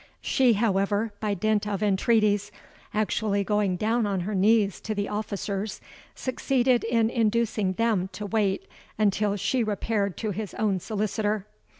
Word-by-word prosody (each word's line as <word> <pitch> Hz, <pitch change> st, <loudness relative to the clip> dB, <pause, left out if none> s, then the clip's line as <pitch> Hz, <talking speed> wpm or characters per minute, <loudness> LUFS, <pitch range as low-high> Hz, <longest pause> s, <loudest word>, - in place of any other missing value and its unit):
She, 255 Hz, -3 st, +3 dB
however, 205 Hz, 0 st, +1 dB
by 210 Hz, -2 st, -1 dB
dint 210 Hz, +2 st, +1 dB
of 205 Hz, 0 st, -2 dB
entreaties—actually 210 Hz, 0 st, 0 dB
going 205 Hz, -2 st, +1 dB
down 220 Hz, +3 st, +1 dB
upon 195 Hz, -2 st, -1 dB
her 205 Hz, +5 st, -3 dB
knees 205 Hz, 0 st, +3 dB
to 215 Hz, -, -3 dB
the 205 Hz, 0 st, -1 dB
officers—succeeded 220 Hz, +5 st, -2 dB
in 230 Hz, -1 st, +2 dB
inducing 225 Hz, -4 st, +1 dB
them 210 Hz, -3 st, +1 dB
to 210 Hz, -, -5 dB
wait 210 Hz, -, 0 dB, 0.3 s
while 205 Hz, -1 st, +1 dB
she 240 Hz, +5 st, 0 dB
repaired 205 Hz, -2 st, -1 dB
to 215 Hz, -2 st, -2 dB
his 205 Hz, +1 st, -5 dB
own 205 Hz, -3 st, +1 dB
solicitor. 210 Hz, +1 st, -1 dB
210 Hz, 130 wpm, -26 LUFS, 200-220 Hz, 0.3 s, She